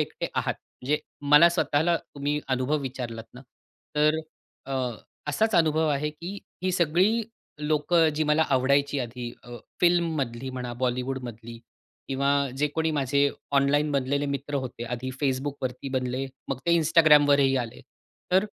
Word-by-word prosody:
एकटे -, -, -3 dB
आहात -, -, 0 dB
म्हणजे, 145 Hz, +4 st, -3 dB, 0.2 s
मला 150 Hz, +4 st, +7 dB
स्वतःला 170 Hz, -1 st, +1 dB
तुम्ही 145 Hz, +1 st, -3 dB
अनुभव 130 Hz, +3 st, +1 dB
विचारलात 120 Hz, -4 st, -5 dB
ना 125 Hz, -, -10 dB, 0.6 s
तर 150 Hz, +1 st, +3 dB, 0.5 s
अ, 135 Hz, -, -5 dB, 0.6 s
असाच 215 Hz, +9 st, +1 dB
अनुभव 160 Hz, -1 st, +3 dB
आहे 150 Hz, +1 st, 0 dB
की 175 Hz, +6 st, -7 dB, 0.2 s
ही 185 Hz, -, +1 dB
सगळी 185 Hz, +7 st, +2 dB, 0.4 s
लोक 150 Hz, +2 st, 0 dB, 0.2 s
जी 155 Hz, -, 0 dB
मला 150 Hz, +1 st, +3 dB
आवडायची 140 Hz, +2 st, +2 dB
आधी 120 Hz, 0 st, -5 dB
अ, 120 Hz, 0 st, -9 dB, 0.2 s
फिल्ममधली 155 Hz, -8 st, +1 dB
म्हणा. 125 Hz, -1 st, -5 dB
बॉलिवूडमधली 125 Hz, -2 st, -4 dB, 0.5 s
किंवा 140 Hz, +1 st, 0 dB, 0.3 s
जे 150 Hz, +2 st, +2 dB
कोणी 160 Hz, 0 st, +1 dB
माझे 140 Hz, -1 st, +2 dB, 0.3 s
ऑनलाइन 145 Hz, +2 st, +2 dB
बनलेले 140 Hz, +1 st, 0 dB
मित्र 140 Hz, +1 st, -4 dB
होते 120 Hz, -1 st, -6 dB
आधी 125 Hz, +2 st, -4 dB
Facebookवरती 135 Hz, -1 st, -2 dB
बनले 130 Hz, +1 st, -1 dB, 0.2 s
मग 135 Hz, -2 st, -2 dB
ते 170 Hz, 0 st, +4 dB
Instagramवरही 145 Hz, -4 st, +5 dB
आले 120 Hz, -3 st, -4 dB, 0.5 s
तर 190 Hz, +2 st, +5 dB
140 Hz, 135 wpm, -26 LUFS, 130-155 Hz, 0.6 s, मला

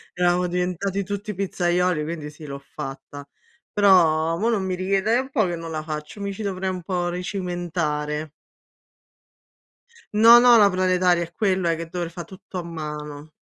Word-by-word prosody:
eravamo 180 Hz, 0 st, +2 dB
diventati 180 Hz, +2 st, -1 dB
tutti 205 Hz, +1 st, -5 dB
pizzaioli, 180 Hz, -3 st, 0 dB
quindi 155 Hz, -1 st, -5 dB
sì, 150 Hz, 0 st, -12 dB
l'ho 140 Hz, -1 st, -6 dB, 0.2 s
fatta. 140 Hz, +1 st, -7 dB, 0.5 s
Però 165 Hz, -5 st, +4 dB
mò 225 Hz, -, +1 dB
non 215 Hz, -5 st, 0 dB
mi 185 Hz, -1 st, -1 dB
richiede 195 Hz, +5 st, +1 dB
è -, -, +3 dB
un 265 Hz, -, -7 dB
po' 240 Hz, -6 st, +2 dB
che 175 Hz, -, -2 dB
non 165 Hz, 0 st, -7 dB
la 155 Hz, -1 st, -3 dB
faccio, 155 Hz, +5 st, -7 dB
mi 200 Hz, 0 st, -3 dB
ci 205 Hz, +3 st, -7 dB
dovrei 190 Hz, -1 st, -2 dB
un 185 Hz, -1 st, -5 dB
po' 175 Hz, 0 st, -2 dB
ricimentare. 170 Hz, -5 st, -3 dB, 1.8 s
Non 230 Hz, +3 st, +8 dB
ho 245 Hz, -1 st, +8 dB
la 205 Hz, -2 st, +6 dB
planetaria 185 Hz, -1 st, +2 dB
è 170 Hz, 0 st, -7 dB
quella 185 Hz, -5 st, +1 dB
che 165 Hz, 0 st, -6 dB
dover 175 Hz, -1 st, -4 dB
fa 175 Hz, -1 st, -7 dB
tutto 185 Hz, +1 st, -10 dB
a -, -, -3 dB
mano. 150 Hz, -2 st, -7 dB
180 Hz, 170 wpm, -23 LUFS, 160-195 Hz, 1.8 s, Non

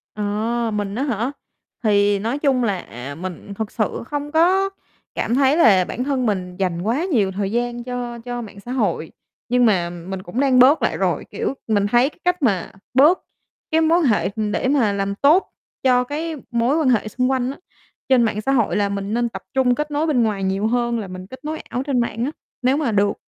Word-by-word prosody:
Ờ, 220 Hz, +3 st, -1 dB
mình 205 Hz, -1 st, -2 dB
á 260 Hz, -, -1 dB
hả? 245 Hz, -1 st, -1 dB, 0.5 s
Thì 205 Hz, -2 st, +3 dB
nói 235 Hz, +7 st, -2 dB
chung 270 Hz, -4 st, +2 dB
là, 200 Hz, -5 st, 0 dB
à, 135 Hz, -1 st, -8 dB
mình 185 Hz, +4 st, -7 dB
thực 220 Hz, +1 st, -4 dB
sự 215 Hz, -1 st, -2 dB
không 290 Hz, 0 st, -4 dB
có 370 Hz, +5 st, +3 dB, 0.5 s
cảm 235 Hz, -, 0 dB
thấy 275 Hz, +2 st, +3 dB
là 195 Hz, -, +5 dB
bản 250 Hz, -, -4 dB
thân 270 Hz, -2 st, 0 dB
mình 185 Hz, -4 st, -2 dB
dành 180 Hz, -3 st, -1 dB
quá 235 Hz, -, 0 dB
nhiều 220 Hz, -, +1 dB
thời 195 Hz, +1 st, -2 dB
gian 240 Hz, +1 st, -2 dB
cho 245 Hz, -1 st, -5 dB
cho 245 Hz, +1 st, -5 dB
mạng 205 Hz, -3 st, -10 dB
xã 240 Hz, +5 st, -8 dB
hội, 200 Hz, -10 st, -1 dB, 0.4 s
nhưng 245 Hz, 0 st, +4 dB
mà 180 Hz, -6 st, +2 dB
mình 180 Hz, +2 st, -7 dB
cũng 185 Hz, +8 st, -4 dB
đang 265 Hz, -2 st, +4 dB
bớt 270 Hz, +5 st, +6 dB
lại -, -, 0 dB
rồi, -, -, 0 dB
kiểu, -, -, -2 dB
mình 205 Hz, -2 st, +2 dB
thấy 240 Hz, +5 st, +3 dB
cái 310 Hz, -, -25 dB
cách 360 Hz, -1 st, +1 dB
mà 200 Hz, -10 st, +1 dB, 0.2 s
bớt 295 Hz, +8 st, +5 dB, 0.5 s
cái 320 Hz, +1 st, +3 dB
mối 325 Hz, +2 st, +4 dB
quan 340 Hz, -, +1 dB
hệ, 220 Hz, -6 st, +2 dB
ừm, 215 Hz, -2 st, -1 dB
để -, -, 0 dB
mà 255 Hz, -7 st, +2 dB
làm 200 Hz, 0 st, -2 dB
tốt 305 Hz, -, +4 dB, 0.4 s
cho 250 Hz, -1 st, +4 dB
cái 310 Hz, +5 st, -4 dB, 0.2 s
mối 235 Hz, +5 st, +2 dB
quan 310 Hz, -5 st, +2 dB
hệ 220 Hz, -4 st, +2 dB
xung 255 Hz, +4 st, 0 dB
quanh 260 Hz, -1 st, 0 dB
á, 275 Hz, -, -10 dB, 0.5 s
trên 255 Hz, -3 st, +5 dB
mạng 215 Hz, -2 st, 0 dB
xã 270 Hz, -, 0 dB
hội 235 Hz, -6 st, +2 dB
là 205 Hz, -1 st, +1 dB
mình 200 Hz, +1 st, -3 dB
nên 235 Hz, 0 st, +1 dB
tập -, -, -8 dB
trung 260 Hz, -2 st, +3 dB
kết 300 Hz, +3 st, -3 dB
nối 295 Hz, +2 st, 0 dB
bên 260 Hz, -6 st, +3 dB
ngoài 210 Hz, -3 st, -1 dB
nhiều 195 Hz, +2 st, 0 dB
hơn 235 Hz, 0 st, 0 dB
là 205 Hz, -, -5 dB
mình 185 Hz, 0 st, -8 dB
kết 260 Hz, +6 st, -12 dB
nối 310 Hz, +1 st, -3 dB
ảo 250 Hz, -, -4 dB
trên 270 Hz, -3 st, 0 dB
mạng 235 Hz, 0 st, -1 dB
á, 285 Hz, -, -2 dB, 0.3 s
nếu 260 Hz, +3 st, +2 dB
mà 295 Hz, -6 st, 0 dB
được. 205 Hz, -1 st, +2 dB
235 Hz, 225 wpm, -21 LUFS, 205-270 Hz, 0.5 s, bớt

